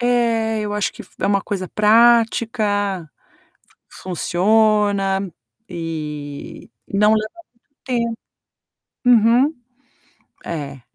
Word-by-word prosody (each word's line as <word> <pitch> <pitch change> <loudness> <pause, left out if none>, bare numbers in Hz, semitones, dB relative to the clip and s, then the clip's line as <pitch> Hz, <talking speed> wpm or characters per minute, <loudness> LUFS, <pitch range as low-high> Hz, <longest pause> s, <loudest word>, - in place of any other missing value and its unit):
É, 230 -2 +1
eu 210 -1 -3
acho 210 - -1
que - - -10
f - - -20
é - - +1
uma 200 -1 +2
coisa 185 -3 -4
prática, 215 -4 +2 0.8
funciona, 195 +1 +1 0.4
e 150 -4 -7 0.2
não 210 +2 +3
leva 215 0 0 0.4
muito 285 - -51
tempo. 235 -3 -2 0.9
Uhum. 245 +5 +4 0.9
É. 140 -5 -6
210 Hz, 95 wpm, -20 LUFS, 185-230 Hz, 0.9 s, Uhum